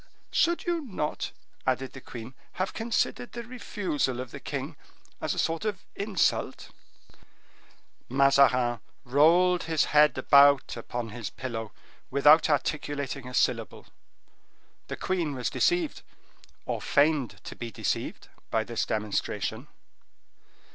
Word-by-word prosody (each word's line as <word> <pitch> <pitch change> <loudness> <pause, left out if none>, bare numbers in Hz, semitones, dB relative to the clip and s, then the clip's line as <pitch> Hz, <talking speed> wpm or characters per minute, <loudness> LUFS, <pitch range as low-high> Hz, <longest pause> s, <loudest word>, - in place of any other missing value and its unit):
"Should 345 0 +2
you 345 -1 0
not," 185 - -3 0.4
added 130 0 0
the 130 - -9
queen, 120 +1 -9 0.2
"have 185 +1 -2
considered 235 +1 -1
the 235 - -5
refusal 200 - -2
of 125 -2 -6
the - - -8
king - - -5 0.5
as - - -1
a - - -10
sort 165 +2 0
of 210 -4 -3
insult?" 200 -2 0 1.4
Mazarin 130 -3 +4 0.3
rolled 170 +7 +4
his 160 -2 +2
head 150 0 +6
about 140 -1 +5
upon 120 0 -5
his 110 -1 -6
pillow, 115 -4 -5 0.4
without 150 +4 +6
articulating 145 -2 -1
a 125 - -6
syllable. - - 0 1.0
The - - -5
queen 170 -6 -1
was 125 - -2
deceived, 350 -3 +1 0.6
or - - -3
feigned 145 -3 +2
to - - -8
be 120 - -6
deceived, 110 - -3 0.2
by 110 - +1
this 115 0 -2
demonstration. 105 -1 -2
145 Hz, 120 wpm, -28 LUFS, 125-180 Hz, 1.4 s, head